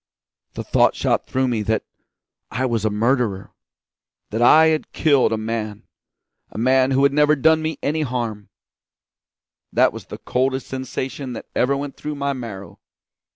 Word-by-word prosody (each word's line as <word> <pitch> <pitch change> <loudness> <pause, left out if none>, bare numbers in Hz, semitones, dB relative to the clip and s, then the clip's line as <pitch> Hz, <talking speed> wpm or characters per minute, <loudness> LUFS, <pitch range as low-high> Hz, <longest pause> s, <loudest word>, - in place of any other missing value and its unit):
The - - -4
thought - - +3
shot - - 0
through 130 0 0
me 120 -3 -1
that 110 +1 -1 0.7
I 130 +2 -2
was 115 -4 -1
a - - +3
murderer; 110 -2 0 0.8
that 110 +2 -2
I 160 +6 +7
had 155 -1 -1
killed 140 -7 +3
a 110 - 0
man 110 -1 -4 0.7
a - - -11
man 130 +3 +3
who 135 0 +2
had 140 - +4
never 150 +1 +4
done 160 +3 +3
me 160 0 -3
any 155 +2 0
harm. 115 -7 -3 1.2
That - - +3
was - - -9
the - - -8
coldest 130 +1 -1
sensation 130 0 -5
that - - -7
ever 135 +2 +2
went 140 0 -6
through 150 0 -5
my 140 0 -1
marrow. 115 -7 -8
130 Hz, 160 wpm, -21 LUFS, 115-140 Hz, 1.2 s, I